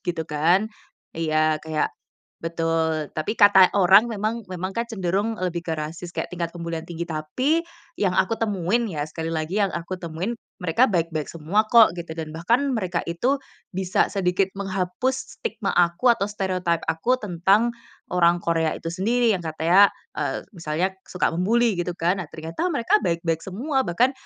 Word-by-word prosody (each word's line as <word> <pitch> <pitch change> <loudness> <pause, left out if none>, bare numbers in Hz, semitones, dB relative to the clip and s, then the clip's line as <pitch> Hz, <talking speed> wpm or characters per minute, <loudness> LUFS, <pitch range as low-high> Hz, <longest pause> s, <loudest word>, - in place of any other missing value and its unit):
gitu 170 -3 -3
kan. 165 +7 +2 0.5
Iya, 155 -1 +1
kayak 155 -1 -1 0.5
betul, 165 -2 -1
tapi 155 +6 -1
kata 200 -3 +7
orang 195 +5 +6
memang 215 +2 -2
memang 185 +1 -4
kan 235 - 0
cenderung 205 +1 -1
lebih 175 -2 -1
ke 165 - -1
rasis, 160 +3 -5
kayak - - -3
tingkat 170 -1 -3
pembulian 170 -1 -4
tinggi. 170 0 -4
Tapi, 170 - 0 0.4
yang 185 -3 +1
aku 225 +4 +2
temuin 210 +2 0
ya, 150 -5 -3
sekali 160 +1 -5
lagi 165 +5 -1
yang 200 - +3
aku 170 +2 -4
temuin, 170 +6 -3 0.3
mereka 180 +9 +3
baik-baik 165 -5 -1
semua 170 +7 0
kok, 230 -6 +7
gitu. 170 -2 -6
Dan 160 -2 -5
bahkan, 235 - +1
mereka 180 -4 -1
itu, 240 +12 +1 0.4
bisa 185 -1 +1
sedikit 190 -1 +1
menghapus 195 +7 -2
stigma 240 - -3
aku 175 +7 +3
atau 215 - -1
stereotype 185 -4 -1
aku 235 +11 +1
tentang 200 +5 +2 0.4
orang 175 -1 +4
Korea 165 -1 +1
itu 165 - -6
sendiri, 230 +6 +2
yang 180 - -4
katanya, 165 +5 +5 0.3
eee, - - -2
misalnya 170 +2 -1 0.2
suka 180 - 0
membuli, 225 +5 +2
gitu 175 - -2
kan. 175 +4 +2
Nah 160 - -10
ternyata 165 - -3
mereka 330 - +2
baik-baik 165 -1 0
semua. 265 - -1
Bahkan, 235 +10 +2
180 Hz, 160 wpm, -24 LUFS, 165-210 Hz, 0.5 s, kata